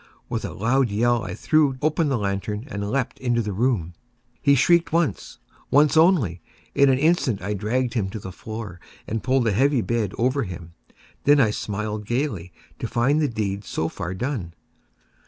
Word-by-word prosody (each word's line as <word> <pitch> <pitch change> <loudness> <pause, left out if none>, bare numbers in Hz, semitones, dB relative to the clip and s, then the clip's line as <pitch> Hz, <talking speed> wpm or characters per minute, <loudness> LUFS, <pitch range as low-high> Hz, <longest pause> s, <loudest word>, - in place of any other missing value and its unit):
With - - -2
a - - -4
loud 120 +4 +1
yell, 120 +2 +1
I 90 -3 -5
threw 150 -4 +2
open 155 +1 +1
the 135 - +1
lantern 105 +2 -3
and 100 -1 -3
leaped 130 +1 -2
into 120 -2 0
the 105 -1 -3
room. 100 -6 0 0.5
He 140 0 +5
shrieked 170 +5 +3
once—once 150 -2 0
only. 155 - +3 0.3
In 140 0 +5
an 130 - +4
instant 145 - +2
I 100 +3 -3
dragged 115 +5 -1
him 105 -5 -1
to 110 - -6
the 95 -1 -8
floor, 110 -2 -7 0.3
and 110 0 -3
pulled 130 +1 +2
the 110 - +2
heavy 135 +5 +2
bed 110 -4 -1
over 130 +4 +1
him. 85 -5 -7 0.2
I - - -28 0.3
then 140 -7 +5
smiled 105 0 -4
gaily, 120 - -2 0.3
to - - -3
find 135 +7 +2
the 150 - +2
deed 105 -4 -3
so 80 -4 -2
far 85 +3 -5
done. 100 - -4
115 Hz, 175 wpm, -23 LUFS, 100-135 Hz, 0.5 s, He